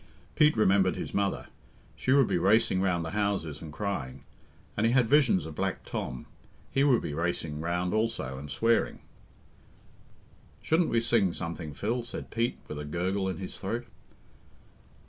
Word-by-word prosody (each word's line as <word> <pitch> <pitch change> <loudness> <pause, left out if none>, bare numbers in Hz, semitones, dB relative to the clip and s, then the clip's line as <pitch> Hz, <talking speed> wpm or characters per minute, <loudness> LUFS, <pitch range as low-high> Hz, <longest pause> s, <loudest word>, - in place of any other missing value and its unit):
Pete 150 -4 +4
remembered 95 -3 +4
his - - -5
mother 100 -1 0 0.5
she 130 - -1
would 140 -1 +6
be 90 - 0
racing 100 0 +3
round 90 -3 +1
the 80 - -4
houses 100 -7 -1
and 80 -3 -8
crying; 75 -8 -4 0.5
and 110 +2 +2
he 115 - +2
had 125 -3 +4
visions 125 - +4
of 80 - -7
Black - - -2
Tom 65 0 -4 0.5
he 135 - +2
would 130 -5 +4
be 75 - -3
racing 80 -2 -2
round 90 +2 -1
also 105 - -1
and 75 +1 -8
swearing. 115 +12 +1 1.6
"Shouldn't 165 +2 +2
we 115 - +2
sing 110 -6 +2
something, 85 -3 -5
Phil?" 115 - -1
said 120 - -8
Pete, 115 +1 0
with 75 - -6
a - - -4
gurgle 95 +6 -1
in 95 - -3
his 95 -1 -6
throat. 115 +5 -3
95 Hz, 165 wpm, -29 LUFS, 80-115 Hz, 1.6 s, would